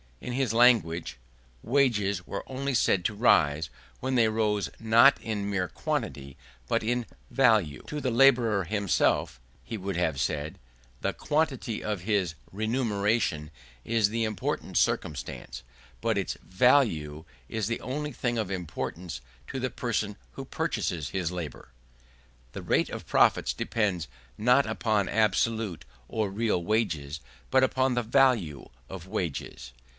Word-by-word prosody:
In 125 - -5
his 130 -3 0
language 110 - +3 0.5
wages 105 -8 +1
were 100 - -4
only 135 +1 -3
said 95 -6 +2
to 105 - 0
rise, 80 - +3 0.3
when 130 +1 -2
they 115 -2 +5
rose 105 -2 0
not 115 +5 +6
in 105 -3 -3
mere 95 -3 0
quantity 70 -4 -4 0.3
but - - +1
in 120 +1 0 0.3
value. 110 - +3
To 150 - -4
the 130 - 0
labourer 120 -5 +4
himself 100 -8 +1 0.2
(he 115 - -5
would 95 -1 -4
have 80 -6 0
said) 75 -1 -2 0.4
the - - -1
quantity 145 -7 -1
of 105 -4 -2
his 95 -4 0 0.2
remuneration 105 - 0 0.3
is 115 -3 +2
the 115 +1 -1
important 110 -3 -2
circumstance: 65 -4 -2 0.4
but 115 -2 +1
its 95 - -2
value 95 - +2 0.2
is 110 -3 -2
the 115 - -2
only 150 +3 -3
thing 120 -3 -2
of 105 -4 -2
importance 85 -4 -5 0.3
to 135 - -4
the 130 0 -1
person 110 -4 -2
who - - -8
purchases 80 -6 -2
his 90 -3 -2
labour. 85 -9 -6 0.8
The - - -6
rate - - +1
of - - -7
profits - - +3
depends 100 -8 -1 0.3
not 125 +5 +4
upon 110 -2 0
absolute 110 -2 +1 0.2
or 110 -2 -1
real 105 -3 0
wages, 85 -8 -1 0.3
but 130 0 +5
upon 130 0 +2
the 120 0 0
value 115 - +2 0.2
of 95 -1 -8
wages. 80 - -4
105 Hz, 140 wpm, -28 LUFS, 90-120 Hz, 0.8 s, not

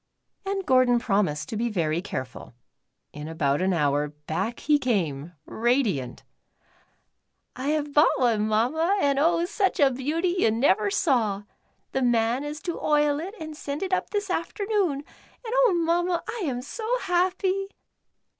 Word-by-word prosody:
And 390 -1 -2
Gordon 255 -2 +4
promised 195 -10 0
to 225 - -4
be 235 +2 -1
very 170 -5 -1
careful. 130 - -7 0.6
In 150 +1 -7
about 145 -2 0
an 190 +1 +2
hour 145 -3 +1
back 160 +10 -4
he 295 0 +3
came, 175 - -1
radiant. 220 - 0 0.7
" - - -43 0.5
I 260 +2 -4
have 295 -1 -1
bought 300 +1 +4
one. 225 -4 +2
Mamma, 305 - +1
and 280 -5 +2
oh, 335 +3 +3
such 390 +1 0
a 280 -2 +5
beauty 320 +8 -1
you 225 - +4
never 215 -3 +2
saw. 220 - +1 0.5
The 265 - -1
man 240 +1 +2
is 295 +2 -6
to 345 - -4
oil 295 -1 +2
it 380 +7 -6
and 315 -1 -7
send 290 +2 -5
it 375 -1 -3
up - - 0
this 410 -2 -2
afternoon, 370 -4 -1 0.4
and 455 - -4
oh. - - +4
Mamma, 345 +1 +1
I 450 -4 -3
am 250 -4 -3
so 460 - -2
happy." 375 +1 0
275 Hz, 155 wpm, -25 LUFS, 210-345 Hz, 0.7 s, a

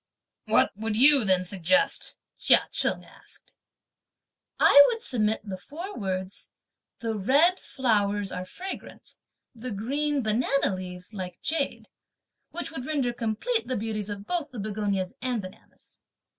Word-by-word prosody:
"What - - +2
would 220 +1 -3
you 270 +2 +6
then 185 -2 +2
suggest?" 205 +10 +1 0.2
Chia - - +5
Cheng - - +2
asked. - - -15 1.0
"I 285 0 +9
would 455 -1 -2
submit 220 -3 0
the 190 -3 -6
four 345 - -8
words, 190 -2 -4 0.5
'the 225 -1 -2
red 285 - +3
(flowers) 205 -5 0
are 180 - -4
fragrant, 370 - -9 0.4
the 250 +1 -7
green 275 +7 -1
(banana 235 +2 +1
leaves) 180 +1 -7
like 185 -3 -6
jade,' 305 -1 -2 0.6
which 345 - -4
would 265 -5 -6
render 275 -6 0
complete 240 - -2
the 255 - -1
beauties 215 -1 -3
of 200 -1 -6
both 335 -1 -2
(the 250 - -11
begonias 200 -2 -2
and 250 -2 -1
bananas)." 185 -2 -13
225 Hz, 135 wpm, -27 LUFS, 200-280 Hz, 1.0 s, I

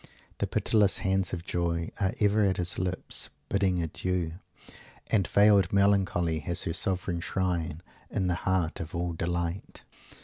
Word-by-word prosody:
The - - 0
pitiless 105 -3 +2
hands 95 -1 0
of 85 -2 -5
Joy 85 -2 -1
"are 100 +3 0
ever 105 0 +3
at 95 -2 +2
his 90 -1 -2
lips, 90 0 -3 0.2
bidding 95 -3 +1
adieu" 85 +1 -2 0.8
and 100 -5 +3
"veiled 100 -3 +5
melancholy 95 -5 +2
has 85 +2 -2
her 85 - -2
'sovran 90 -1 -2
shrine' 85 -3 -2 0.3
in 95 - -1
the 90 - +2
heart 90 -2 0
of 85 +1 -6
all 85 0 -1
delight." 85 +2 -3
90 Hz, 145 wpm, -29 LUFS, 85-95 Hz, 0.8 s, veiled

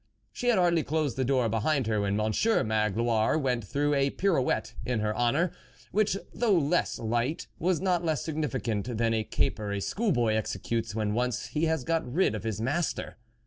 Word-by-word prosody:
She 245 - -4
had 240 -4 +4
hardly 170 -2 +3
closed 150 -4 -1
the 130 - 0
door 130 -2 +2
behind 125 +5 +1
her, 110 -1 0
when 100 0 0
Monsieur 110 - +2
Magloire 110 +3 +1
went 125 -6 0
through 145 +8 0
a 140 -1 +2
pirouette 140 - 0
in 120 0 -1
her 105 0 -1
honour, 140 +9 +2 0.4
which 205 -1 +2 0.2
though 220 -6 +2
less 165 +2 +1
light, 120 +8 -1
was 175 0 +1
not 180 -2 +1
less 155 -2 0
significant 125 -8 -2
than 115 0 +2
the 110 -1 +1
caper 105 -1 -1
a 100 - -1
school 215 - -1
boy 120 -7 +2
executes 110 +2 -2
when 105 -2 0
once 125 +1 -1
he 155 +2 0
has 160 -4 0
got 165 -4 -1
rid 180 +1 +2
of 110 - -4
his 110 -2 -2
master. 145 +9 -1
125 Hz, 185 wpm, -28 LUFS, 110-160 Hz, 0.4 s, had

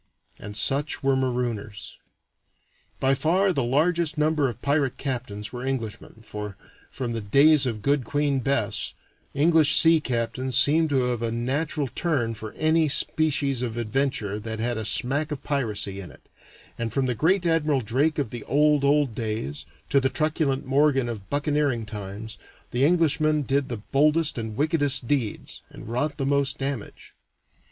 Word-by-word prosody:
And 105 0 -6
such 140 +9 +2
were 135 0 +3
marooners. 120 -5 -3 1.0
By 135 0 +2
far 180 +8 +2
the 135 - 0
largest 155 +5 +1
number 150 -2 +2
of 115 - -8
pirate 140 -2 +1
captains 115 -6 -4
were 125 0 -5
Englishmen, 115 -4 -5
for, 105 -2 -7 0.3
from 120 -3 -4
the 115 - -3
days 140 +6 +5
of 110 -4 -4
good 140 0 +2
Queen 145 +2 0
Bess, 115 -5 -1 0.4
English 160 +1 +4
sea 165 0 +6
captains 125 -1 -2
seemed 160 +2 +4
to 135 -3 +2
have 125 -2 -1
a 115 -1 -1
natural 140 +5 -2
turn 130 -5 -1
for 110 -1 -8
any 160 0 +2
species 140 -3 0
of 120 -3 -3
venture 120 -3 -1
that 110 +1 -5
had 120 +2 -1
a 110 -1 -4
smack 145 +8 0
of 145 - -5
piracy 105 -8 -2
in 90 - -9
it, - - -18 0.5
and 115 -1 -2
from 135 +4 0
the 125 - 0
great 175 - +1
Admiral 155 -4 +2
Drake 135 +8 0
of 140 -7 -2
the 120 -3 -6
old, 150 0 +3
old 140 -3 +2
days, 105 - -4 0.2
to 140 - +5
the 135 - +1
truculent 150 -2 -1
Morgan 135 -2 +2
of 105 -5 -7
buccaneering 145 -5 0
times, 105 0 -8 0.3
the 125 +2 0
Englishman 155 -2 +3
did 140 0 0
the 120 - -3
boldest 150 0 +3
and 110 -1 -5
wickedest 145 -4 +2
deeds, 125 -7 -2
and - - -12
wrought 145 +6 -2
the 135 - -2
most 140 0 +1
damage. 135 -5 -5
135 Hz, 160 wpm, -25 LUFS, 115-150 Hz, 1.0 s, sea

